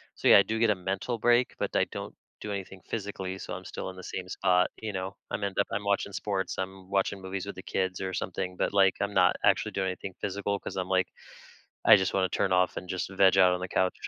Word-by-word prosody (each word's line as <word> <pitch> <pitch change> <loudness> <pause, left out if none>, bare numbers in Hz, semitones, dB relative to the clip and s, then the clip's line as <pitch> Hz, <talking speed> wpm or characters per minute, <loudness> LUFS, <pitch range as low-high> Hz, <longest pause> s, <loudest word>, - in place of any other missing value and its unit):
so, - - -1
yeah, - - +10
I 100 - +5
do 110 0 -2
get 115 -2 +4
a - - +2
mental 95 +6 -3
break, 120 +2 +3
but - - -2
I - - +4
don't - - -6 0.3
do 105 - -5
anything 95 -1 -6
physically, 95 -3 -4
so 90 - -6
I'm 90 +1 -7
still - - -5
in 95 - -14
the 95 - -9
same 90 0 -5
spot, 90 -1 +2
you 110 -2 -4
know? 95 +1 -4 0.2
I'm 100 - -3
end 100 -1 -3
up 100 - +2
I'm 105 +1 -1
watching 100 0 0
sports. 95 -3 -2
I'm 95 0 -5
watching 100 0 0
movies 95 0 -4
with 100 - -6
the 95 - -9
kids 95 -1 -2
or 95 -1 -3
something, 90 0 -3
but, - - 0
like, 95 -1 +5
I'm 100 0 -1
not - - +4
actually - - +3
doing 95 -1 -1
anything 95 +1 -6
physical 100 0 -1
'cause - - -7
I'm 95 -1 -1
like 95 -1 +2 0.8
I - - +9
just 95 -1 0
wanna 95 -1 +2
turn 100 - 0
off 90 0 +2
and 90 - -10
just 95 +1 -3
veg 95 0 +4
out 90 -1 +6
on 90 - -3
the 90 - -4
couch. 95 -1 +1
95 Hz, 255 wpm, -28 LUFS, 95-100 Hz, 0.8 s, yeah